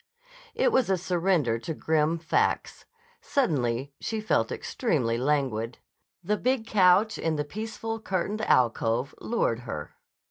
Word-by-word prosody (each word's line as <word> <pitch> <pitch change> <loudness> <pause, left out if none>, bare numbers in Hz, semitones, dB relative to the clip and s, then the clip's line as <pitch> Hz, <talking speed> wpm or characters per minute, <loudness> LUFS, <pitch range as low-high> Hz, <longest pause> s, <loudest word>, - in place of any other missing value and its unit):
It - - +3
was 255 - +2
a 190 - +3
surrender 170 -9 +1
to 160 +6 -5
grim 160 +1 +1
facts. 165 0 0 0.4
Suddenly 135 - 0
she 220 - -3
felt 215 - +1
extremely 145 - -1
languid. 130 -4 0 0.5
The 210 +4 0
big 255 -1 0
couch 195 +1 +4
in 160 -1 0
the 150 -1 -2
peaceful, 225 +5 -5
curtained 200 +1 -2
alcove 120 - +2
lured 170 - 0
her. 115 -12 -6
165 Hz, 130 wpm, -27 LUFS, -, 0.5 s, couch